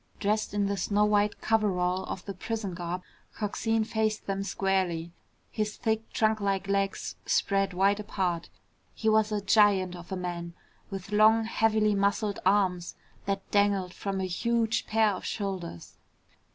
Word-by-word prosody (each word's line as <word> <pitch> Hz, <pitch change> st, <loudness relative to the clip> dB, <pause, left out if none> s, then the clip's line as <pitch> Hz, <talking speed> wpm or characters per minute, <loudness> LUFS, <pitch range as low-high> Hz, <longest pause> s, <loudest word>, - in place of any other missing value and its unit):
Dressed 210 Hz, 0 st, 0 dB
in 205 Hz, -1 st, +2 dB
the 200 Hz, 0 st, -1 dB
snow 205 Hz, +3 st, +2 dB
white 210 Hz, 0 st, +1 dB
coverall 190 Hz, -4 st, +1 dB
of 185 Hz, -, -6 dB
the 200 Hz, -, -5 dB
prison 205 Hz, 0 st, -4 dB
garb, 175 Hz, +1 st, -4 dB, 0.3 s
Coxine 225 Hz, +1 st, 0 dB
faced 220 Hz, -1 st, -1 dB
them 195 Hz, 0 st, -2 dB
squarely, 190 Hz, -4 st, -1 dB, 0.4 s
his 215 Hz, -1 st, -2 dB
thick 220 Hz, -1 st, -1 dB
trunklike 200 Hz, -3 st, +1 dB
legs 195 Hz, 0 st, -1 dB
spread 195 Hz, -1 st, +2 dB
wide 200 Hz, +2 st, +3 dB
apart. 180 Hz, -5 st, -2 dB, 0.5 s
He 220 Hz, -, -3 dB
was 220 Hz, 0 st, +3 dB
a 210 Hz, -1 st, 0 dB
giant 195 Hz, -3 st, +4 dB
of 175 Hz, +1 st, -11 dB
a 190 Hz, -, -2 dB
man 170 Hz, -1 st, -5 dB, 0.3 s
with 195 Hz, 0 st, -7 dB
long 215 Hz, +2 st, +5 dB
heavily 220 Hz, -1 st, +2 dB
muscled 200 Hz, +1 st, 0 dB
arms 185 Hz, -3 st, +1 dB, 0.3 s
that 195 Hz, -1 st, -2 dB
dangled 200 Hz, -3 st, +2 dB
from 195 Hz, -1 st, -3 dB
a 190 Hz, -, -1 dB
huge 230 Hz, +5 st, 0 dB
pair 220 Hz, -1 st, +3 dB
of 190 Hz, -, -5 dB
shoulders. 190 Hz, -, -5 dB
200 Hz, 150 wpm, -28 LUFS, 185-215 Hz, 0.5 s, long